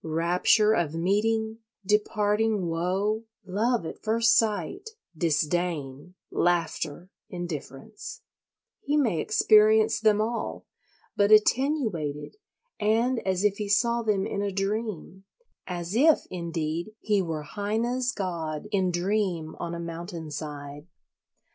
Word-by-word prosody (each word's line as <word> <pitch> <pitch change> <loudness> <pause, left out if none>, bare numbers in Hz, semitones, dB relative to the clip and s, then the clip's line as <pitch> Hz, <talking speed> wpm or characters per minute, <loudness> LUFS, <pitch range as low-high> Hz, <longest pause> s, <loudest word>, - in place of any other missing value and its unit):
Rapture 175 +7 +3
of 165 -7 0
meeting, 220 +5 0 0.3
departing 210 0 +1
woe, 190 +7 -1 0.2
love 215 +2 0
at - - -7
first 225 +1 +3
sight, 220 - 0 0.3
disdain, 160 -1 -1 0.2
laughter, 175 0 -1 0.2
indifference—he 175 - -7
may 225 - +2
experience 215 +5 +4
them 215 -1 +3
all, 225 +2 -2 0.5
but 205 +1 +3
attenuated 215 - +2 0.4
and 230 +4 +2
as 190 0 +1
if 205 -1 +2
he 210 -1 -4
saw 235 +3 +2
them 205 -4 0
in 200 - -3
a 200 -1 -1
dream; 195 -1 -3 0.4
as 175 0 -4
if, 295 +7 +4
indeed, 170 +2 -3
he 205 -2 +1
were 160 -4 -3
Heine's 230 +8 -1
god 170 - -4
in 190 -3 +2
dream 175 -3 -1
on 170 0 -4
a - - -5
mountain 170 -1 -6
side. 145 0 -7
195 Hz, 110 wpm, -27 LUFS, 170-220 Hz, 0.5 s, experience